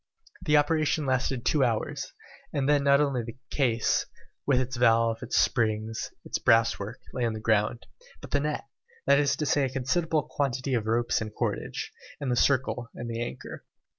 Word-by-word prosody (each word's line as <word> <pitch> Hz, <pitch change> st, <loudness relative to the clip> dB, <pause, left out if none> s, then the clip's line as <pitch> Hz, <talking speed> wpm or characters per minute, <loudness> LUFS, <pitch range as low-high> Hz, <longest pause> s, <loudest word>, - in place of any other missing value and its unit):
The 150 Hz, -4 st, +3 dB
operation 155 Hz, 0 st, +2 dB
lasted 130 Hz, -1 st, 0 dB
two 150 Hz, -3 st, +3 dB
hours, 115 Hz, -3 st, -1 dB, 0.4 s
and 135 Hz, -1 st, -1 dB
then 145 Hz, -1 st, +3 dB
not 140 Hz, 0 st, +5 dB
only 140 Hz, -4 st, +1 dB
the 115 Hz, +1 st, -8 dB
case, 120 Hz, -5 st, +1 dB, 0.4 s
with 135 Hz, -3 st, +4 dB
its 130 Hz, 0 st, -2 dB
valve, 115 Hz, -1 st, +3 dB
its -, -, -2 dB
springs, 110 Hz, -2 st, +1 dB, 0.2 s
its -, -, -2 dB
brasswork, 115 Hz, -1 st, +2 dB, 0.2 s
lay 125 Hz, -, -2 dB
on 115 Hz, -2 st, 0 dB
the 110 Hz, -, -5 dB
ground, 110 Hz, +2 st, +1 dB, 0.3 s
but -, -, -11 dB
the 145 Hz, -, +2 dB
net, 150 Hz, +1 st, -2 dB, 0.4 s
that 140 Hz, +1 st, +5 dB
is 145 Hz, -1 st, +2 dB
to 150 Hz, -, -2 dB
say 145 Hz, +1 st, +2 dB
a -, -, -2 dB
considerable 150 Hz, +4 st, 0 dB
quantity 135 Hz, -1 st, -2 dB
of 110 Hz, -3 st, 0 dB
ropes 120 Hz, +1 st, +1 dB
and 110 Hz, -1 st, -6 dB
cordage, -, -, -3 dB, 0.3 s
and 140 Hz, -3 st, -2 dB
the -, -, +2 dB
circle 125 Hz, -2 st, +1 dB
and 120 Hz, 0 st, -5 dB
the 115 Hz, +1 st, -3 dB
anchor. 120 Hz, -, -6 dB
125 Hz, 180 wpm, -27 LUFS, 115-140 Hz, 0.4 s, not